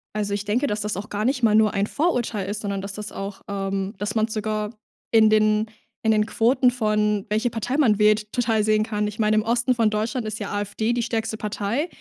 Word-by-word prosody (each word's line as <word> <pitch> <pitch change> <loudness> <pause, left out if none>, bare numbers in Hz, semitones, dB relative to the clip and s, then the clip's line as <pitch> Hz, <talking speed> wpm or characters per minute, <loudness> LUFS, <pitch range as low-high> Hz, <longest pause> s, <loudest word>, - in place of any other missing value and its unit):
Also, 205 -1 -1
ich 205 0 -4
denke, 240 +8 +1
dass 210 -2 -2
das 210 0 -2
auch 200 +3 -6
gar 210 +1 -2
nicht 260 0 +1
mal 215 -2 +4
nur 215 -1 +4
ein 200 +1 0
Vorurteil 240 - -1
ist, 205 +1 -4
sondern 200 -2 -3
dass 200 0 -6
das 210 0 -7
auch 195 0 -6
ähm, 195 0 -3
dass 205 +1 -3
man 220 0 +2
sogar 215 -1 -2 0.4
in 220 -1 +6
den 215 0 +3 0.4
in 220 - +4
den 215 -1 +3
Quoten 250 +3 +3
von, 210 -4 0
welche 220 +3 +1
Partei 240 +5 -2
man 230 -9 +4
wählt, 210 0 +2
total 230 -3 +1
sehen 215 0 +3
kann. 210 -1 -1
Ich 210 +1 -7
meine, 215 0 +3
im - - +4
Osten 240 +3 +1
von 230 -3 +2
Deutschland 215 +2 -2
ist 215 0 -4
ja 205 - -5
AfD 205 +2 -1
die 240 0 0
stärkste 225 -2 -2
Partei, 215 - -2
215 Hz, 230 wpm, -23 LUFS, 210-225 Hz, 0.4 s, in